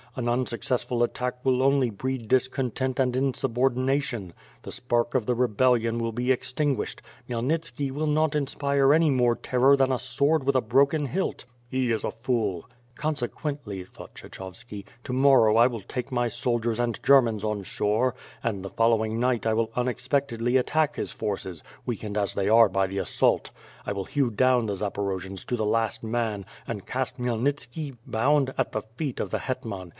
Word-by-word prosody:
An 125 Hz, -2 st, -2 dB
unsuccessful 120 Hz, 0 st, 0 dB
attack 125 Hz, +1 st, -2 dB
will 130 Hz, -1 st, +3 dB
only 135 Hz, -2 st, +3 dB
breed 125 Hz, +2 st, -4 dB
discontent 130 Hz, +1 st, 0 dB
and 125 Hz, -2 st, +2 dB
insubordination; 130 Hz, -4 st, 0 dB, 0.3 s
the -, -, -7 dB
spark 120 Hz, -1 st, 0 dB
of 125 Hz, -4 st, +2 dB
the 125 Hz, -, +1 dB
re 125 Hz, +1 st, +2 dB
bellion 115 Hz, 0 st, +2 dB
will 115 Hz, 0 st, -1 dB
be 125 Hz, +3 st, +1 dB
extinguished 130 Hz, 0 st, -2 dB
— -, -, -28 dB
Khmyelnitski 140 Hz, +3 st, -1 dB
will 150 Hz, +3 st, -2 dB
not 155 Hz, 0 st, +2 dB
inspire 140 Hz, -1 st, +2 dB
any 160 Hz, 0 st, +4 dB
more 125 Hz, -3 st, +3 dB
terror 130 Hz, +2 st, +3 dB
than 135 Hz, -1 st, +3 dB
a 130 Hz, -, 0 dB
sword 140 Hz, +4 st, +1 dB
with 140 Hz, 0 st, +1 dB
a -, -, +5 dB
broken 140 Hz, +6 st, +2 dB
hilt." 185 Hz, +8 st, -2 dB, 0.3 s
'''He 130 Hz, -2 st, +1 dB
is 110 Hz, -, -2 dB
a -, -, -1 dB
fool." 115 Hz, -6 st, -2 dB, 0.3 s
'^Consequently," 140 Hz, -, -3 dB
thought -, -, -13 dB
Kshechovski, 100 Hz, +2 st, -9 dB, 0.2 s
"to 125 Hz, -, -4 dB
morrow 130 Hz, -5 st, +5 dB
I 120 Hz, +2 st, +7 dB
will 120 Hz, -3 st, -4 dB
take 125 Hz, +6 st, -6 dB
my 120 Hz, -1 st, +1 dB
soldiers 120 Hz, -1 st, -1 dB
and 120 Hz, -2 st, -1 dB
Germans 115 Hz, -6 st, +4 dB
on 105 Hz, -2 st, -2 dB
shore, 110 Hz, +7 st, 0 dB, 0.3 s
and 100 Hz, -5 st, -2 dB
the -, -, -4 dB
following 115 Hz, -1 st, +2 dB
night 125 Hz, -2 st, +1 dB
I 110 Hz, -, +2 dB
will 115 Hz, 0 st, +1 dB
unexpecte<lly 125 Hz, -1 st, 0 dB
attack 150 Hz, +3 st, +1 dB
his -, -, -3 dB
forces, 95 Hz, -5 st, -4 dB, 0.2 s
weakened 105 Hz, -3 st, -4 dB
as 100 Hz, -2 st, +1 dB
they 100 Hz, 0 st, 0 dB
are 115 Hz, 0 st, +7 dB
by 95 Hz, 0 st, +1 dB
the 95 Hz, +1 st, -5 dB
assault. -, -, +1 dB, 0.3 s
I -, -, -2 dB
will 100 Hz, -1 st, -4 dB
hew 140 Hz, -4 st, +1 dB
down 125 Hz, +2 st, +3 dB
the 105 Hz, -, -1 dB
Zaporojians 95 Hz, -1 st, -3 dB
to 125 Hz, -, -1 dB
the 110 Hz, -, -1 dB
last 115 Hz, +1 st, 0 dB
man, 110 Hz, -3 st, -2 dB, 0.2 s
and 105 Hz, -4 st, -5 dB
cast 130 Hz, 0 st, -2 dB
Khmyelnitski, 130 Hz, +3 st, -2 dB
bound, 135 Hz, +3 st, +2 dB
at -, -, 0 dB
the 110 Hz, -, -1 dB, 0.2 s
feet 145 Hz, -6 st, -2 dB
of -, -, -3 dB
the -, -, -1 dB
hetman. 110 Hz, -9 st, -5 dB
125 Hz, 175 wpm, -26 LUFS, 110-135 Hz, 0.3 s, I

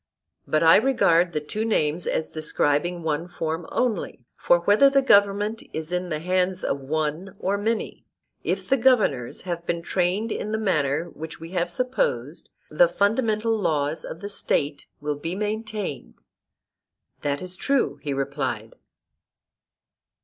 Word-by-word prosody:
But 155 Hz, +1 st, +2 dB
I 165 Hz, 0 st, +8 dB
regard 180 Hz, -9 st, +3 dB
the 155 Hz, -, -1 dB
two 205 Hz, +9 st, -4 dB
names 170 Hz, -7 st, 0 dB
as 160 Hz, -, -1 dB
describing 155 Hz, +2 st, 0 dB
one 160 Hz, +2 st, -1 dB
form 165 Hz, -1 st, -4 dB
only; 215 Hz, -, -1 dB
for 175 Hz, 0 st, +3 dB
whether 205 Hz, +10 st, +5 dB
the 275 Hz, 0 st, +3 dB
government 205 Hz, -1 st, +3 dB
is 160 Hz, +1 st, -4 dB
in 180 Hz, 0 st, -1 dB
the 155 Hz, -, -1 dB
hands 185 Hz, +2 st, 0 dB
of 140 Hz, -, -1 dB
one 155 Hz, +7 st, -3 dB
or 195 Hz, +1 st, 0 dB
many, 220 Hz, +2 st, -2 dB, 0.4 s
if -, -, -2 dB
the 270 Hz, -, +3 dB
governors 215 Hz, -, +2 dB
have 170 Hz, -2 st, -4 dB
been 170 Hz, 0 st, -1 dB
trained 190 Hz, +6 st, 0 dB
in 215 Hz, -, -3 dB
the -, -, +1 dB
manner 160 Hz, -5 st, 0 dB
which 160 Hz, +1 st, -8 dB
we 165 Hz, +1 st, -9 dB
have 175 Hz, -2 st, 0 dB
supposed, 255 Hz, -, -2 dB, 0.2 s
the -, -, +5 dB
fundamental 220 Hz, -, +1 dB
laws 155 Hz, -6 st, 0 dB
of 165 Hz, -, -8 dB
the 200 Hz, -, -4 dB
State 145 Hz, -7 st, -1 dB
will 150 Hz, 0 st, -2 dB
be 165 Hz, +4 st, -3 dB
maintained. 215 Hz, -4 st, -4 dB, 1.1 s
That 140 Hz, -1 st, -1 dB
is 185 Hz, +2 st, -6 dB
true, 275 Hz, +6 st, 0 dB
he 145 Hz, -, -3 dB
replied. 135 Hz, -5 st, -3 dB
175 Hz, 150 wpm, -24 LUFS, 155-215 Hz, 1.1 s, I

